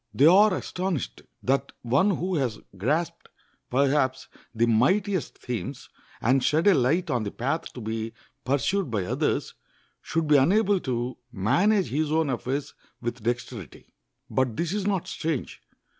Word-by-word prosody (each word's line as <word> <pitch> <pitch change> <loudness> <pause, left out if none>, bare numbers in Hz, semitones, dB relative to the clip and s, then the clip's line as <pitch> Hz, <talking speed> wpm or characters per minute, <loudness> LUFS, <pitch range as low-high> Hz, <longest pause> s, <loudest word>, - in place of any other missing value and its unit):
They 135 - +5
are 200 +6 +7
astonished 180 -7 -3 0.2
that 135 +2 0
one 135 - +3
who 185 +2 -2
has 125 -7 -1 0.2
grasped, 145 - -1 0.4
perhaps, 135 0 +1 0.2
the 115 0 +2
mightiest 180 - +1
themes, 125 +2 -5 0.3
and 130 +3 +3
shed 155 +4 +2
a 200 - +7
light 160 +5 +2
on 125 - +1
the 100 - -2
path 135 +10 -2
to 125 - -8
be 110 +1 -4 0.3
pursued 145 +6 0
by 105 -5 -1
others, - - -1 0.5
should 165 -1 -1
be 150 -1 +6
unable 200 +7 +3
to 125 -3 -3
manage 180 - +2
his 150 +2 0
own 160 -3 +2
affairs 135 +3 -3 0.3
with 120 0 -4
dexterity. 120 - -5 0.3
But 130 -4 0
this 170 +1 -1
is 205 -1 -1
not 195 -4 0
strange. 160 -5 -3
140 Hz, 145 wpm, -26 LUFS, 120-175 Hz, 0.5 s, are